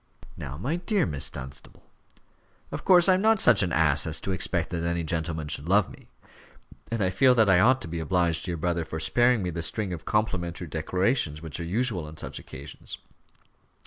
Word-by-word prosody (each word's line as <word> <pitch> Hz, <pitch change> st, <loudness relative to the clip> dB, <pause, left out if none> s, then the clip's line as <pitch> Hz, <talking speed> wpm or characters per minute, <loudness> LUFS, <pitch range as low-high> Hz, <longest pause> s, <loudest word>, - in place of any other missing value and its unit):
"Now, 70 Hz, +1 st, -7 dB
my 135 Hz, -, -2 dB
dear 195 Hz, +3 st, 0 dB
Miss 75 Hz, -4 st, -1 dB
Dunstable 65 Hz, +1 st, -11 dB, 0.5 s
" -, -, -37 dB
"Of -, -, -6 dB
course 180 Hz, -2 st, +5 dB
I 190 Hz, -, +6 dB
am 185 Hz, -, +1 dB
not 220 Hz, 0 st, +3 dB
such 115 Hz, -, +5 dB
an 90 Hz, -3 st, 0 dB
ass 80 Hz, -1 st, +2 dB
as 80 Hz, -, 0 dB
to 95 Hz, -, -3 dB
expect 90 Hz, -2 st, -1 dB
that 85 Hz, -2 st, -2 dB
any 85 Hz, 0 st, -1 dB
gentleman 80 Hz, -1 st, -3 dB
should 75 Hz, +2 st, -3 dB
love 100 Hz, +1 st, +3 dB
me; -, -, -15 dB, 0.8 s
and 115 Hz, -3 st, -1 dB
I 95 Hz, -, +1 dB
feel 130 Hz, +6 st, +4 dB
that 110 Hz, -4 st, +4 dB
I 90 Hz, -, +5 dB
ought 130 Hz, +6 st, +4 dB
to -, -, -7 dB
be 85 Hz, 0 st, -5 dB
obliged 85 Hz, 0 st, 0 dB
to -, -, -5 dB
your 85 Hz, -, -2 dB
brother 85 Hz, +1 st, -1 dB
for 80 Hz, 0 st, -6 dB
sparing 120 Hz, +6 st, +2 dB
me 90 Hz, -, -2 dB
the 85 Hz, 0 st, -4 dB
string 95 Hz, +3 st, 0 dB
of 85 Hz, -, -8 dB
complimentary 90 Hz, -5 st, -2 dB
declarations 80 Hz, -, -1 dB
which 80 Hz, 0 st, -6 dB
are -, -, -4 dB
usual 100 Hz, -2 st, -1 dB
on 75 Hz, +1 st, -11 dB
such -, -, -7 dB
occasions. 70 Hz, +3 st, -10 dB
90 Hz, 210 wpm, -26 LUFS, 80-110 Hz, 0.8 s, I